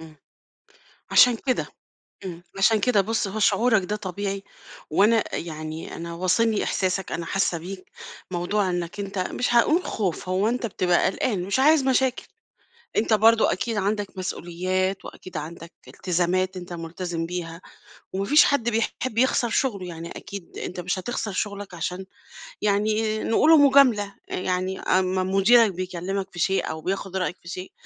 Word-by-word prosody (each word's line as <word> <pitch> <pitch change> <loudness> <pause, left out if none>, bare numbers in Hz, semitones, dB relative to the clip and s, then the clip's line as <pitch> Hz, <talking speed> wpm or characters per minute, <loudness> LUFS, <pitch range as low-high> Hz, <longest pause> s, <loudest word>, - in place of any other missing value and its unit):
إمم. 160 -1 -13 0.9
علشان 250 -2 +6
كده، 255 +2 -1 0.6
إمم، 175 -2 -7
علشان 215 +2 +4
كده. 210 0 +3
بُص 220 +1 -1
هو 205 +3 -5
شعورَك 220 0 +3
ده 210 +3 -2
طبيعي 195 0 -4 0.5
وأنا 215 +7 +3
يعني 155 -1 -6
أنا 170 0 -6
واصلني 200 +5 +1
إحساسَك 190 0 -1
أنا 170 - -3
حاسّة 185 -2 0
بيك، 185 +3 -9 0.4
موضوع 185 +2 0
إنَّك 175 +2 -3
أنت 195 0 -5
مش 240 +6 -1
هاقول 310 +9 +4
خوف، 185 -4 -3
هو 190 +3 +1
أنت 245 0 -1
بتبقى 180 -4 +1
قلقان، 195 -1 -1
مش 200 +6 -1
عايز 300 +2 +5
مشاكل، 260 -1 +1 0.7
أنت 225 +1 +2
برضه 225 +1 +5
أكيد 225 +4 -2
عندَك 205 0 -2
مسؤوليات 185 +1 -2
وأكيد 185 -3 -9
عندَك 165 +2 -8
التزامات 185 +1 -1
أنت 180 -1 -8
ملتزم 170 0 -4
بيها، 170 0 -5 0.5
وما 195 +1 -1
فيش 295 +9 +6
حد 260 -5 +1
بيحب 225 +1 -2
يخسر 245 -1 +2
شُغله، 215 -6 0
يعني 170 -1 -7
أكيد 200 -4 -9
أنت 180 - -5
مش 180 +2 -2
هتخسر 215 +1 -3
شُغلَك؛ 200 0 -4
علشان 180 +2 -4 0.6
يعني 215 +1 +1
نقولوا 315 +8 +5
مجاملة، 260 -8 +5
يعني 185 +1 -2
أمّا 185 0 +1
مديرَك 195 +3 +4
بيكلمَك 185 +2 -4
في 175 - -10
شيء 190 +3 +1
أو 160 - -5
بياخد 190 +2 -3
رأيَك 180 -1 -1
في 170 - -12
شيء، 185 +2 -7
195 Hz, 150 wpm, -24 LUFS, 180-220 Hz, 0.9 s, علشان